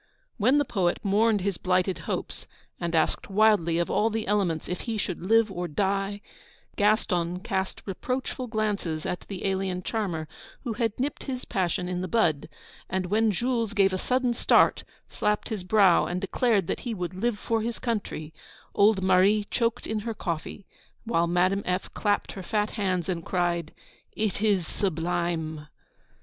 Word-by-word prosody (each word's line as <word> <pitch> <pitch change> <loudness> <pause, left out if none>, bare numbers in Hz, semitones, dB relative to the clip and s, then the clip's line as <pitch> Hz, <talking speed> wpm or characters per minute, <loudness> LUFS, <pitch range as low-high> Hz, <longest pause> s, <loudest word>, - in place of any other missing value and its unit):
When 250 +6 +4
the 290 - +3
poet 180 -5 +1
mourned 210 +1 +3
his 195 -2 -2
blighted 185 0 +1
hopes, - - -4 0.3
and 170 -1 -2
asked 160 +5 +1
wildly 200 -5 +4
of 170 - 0
all 220 - +3
the 220 0 -2
elements 190 -6 0
if 180 - -3
he 230 -2 -3
should 185 -4 -3
live 225 +2 +4
or 175 -1 -3
die, 195 +4 -1 0.5
Gaston 180 -5 +1
cast 190 -3 -3
reproachful 255 +5 -3
glances 205 -8 -2
at 180 - -2
the 195 -2 -5
alien 190 -1 -1
charmer 175 -9 -2 0.4
who 240 -4 -2
had 225 0 -1
nipped 280 +3 -2
his 255 -2 -4
passion 180 -1 -1
in 180 0 -2
the 185 - -2
bud; 170 -11 +1 0.4
and 185 0 -1
when 220 +1 +3
Jules 230 +1 -1
gave 195 -2 +4
a 185 - -1
sudden 250 +1 +1
start, - - +4 0.2
slapped 210 0 -1
his 215 -5 -3
brow, 190 -2 +5
and 175 +1 -2
declared 200 0 +1
that - - -2
he 235 -3 -4
would 180 -2 -4
live 210 +4 -1
for 225 +1 -1
his 230 +1 -3
country, 200 -9 -3 0.4
old 200 -1 +4
Marie 190 +3 +4
choked 230 -2 0
in 220 - -2
her 225 +1 -4
coffee, 175 +2 -4 0.4
while 170 -7 +1
Madame 185 +3 +2
F. 180 +1 -2
clapped 205 -1 0
her 195 - -7
fat 210 +3 -1
hands, 185 -5 -1
and 175 -3 -2
cried: 175 -3 -1 0.4
'It 210 -2 -1
is 200 -5 +2
sublime!' 165 -3 -2
195 Hz, 165 wpm, -27 LUFS, 180-220 Hz, 0.5 s, brow